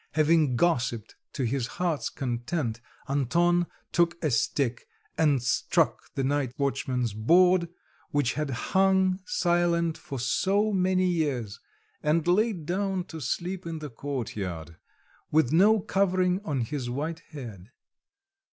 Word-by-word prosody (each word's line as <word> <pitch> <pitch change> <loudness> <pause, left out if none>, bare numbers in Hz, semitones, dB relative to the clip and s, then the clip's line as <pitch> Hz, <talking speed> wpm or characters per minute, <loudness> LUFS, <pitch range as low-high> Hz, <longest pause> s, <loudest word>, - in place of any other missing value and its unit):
Having 155 -3 +3
gossiped 120 -7 0 0.2
to 135 - -2
his 125 0 -1
heart's 170 -5 -1
content, 120 -1 -3 0.3
Anton 170 +6 +2 0.2
took 170 0 +2
a 155 - +1
stick 120 +2 0 0.3
and 145 -6 +2
struck 145 +5 0
the 135 - -1
night 135 -2 0
watchman's 130 -4 -1
board, 170 - +4 0.4
which 145 -4 +1
had 150 -1 -2
hung 190 +7 +2
silent 170 -2 +1
for 140 -7 -6
so 200 - +1
many 185 0 +2
years, 140 - -1 0.4
and 155 +2 +1
laid 185 -1 +1
down 190 +2 -1
to 160 -3 -9
sleep 175 +8 -3
in 165 -1 -4
the 150 -3 -7
courtyard 100 - -5 0.5
with 155 -3 +2
no 210 +6 +5
covering 185 -1 +1
on 145 -9 -1
his 125 0 -3
white 155 +6 -3
head. 115 - -9
155 Hz, 125 wpm, -27 LUFS, 125-175 Hz, 0.5 s, no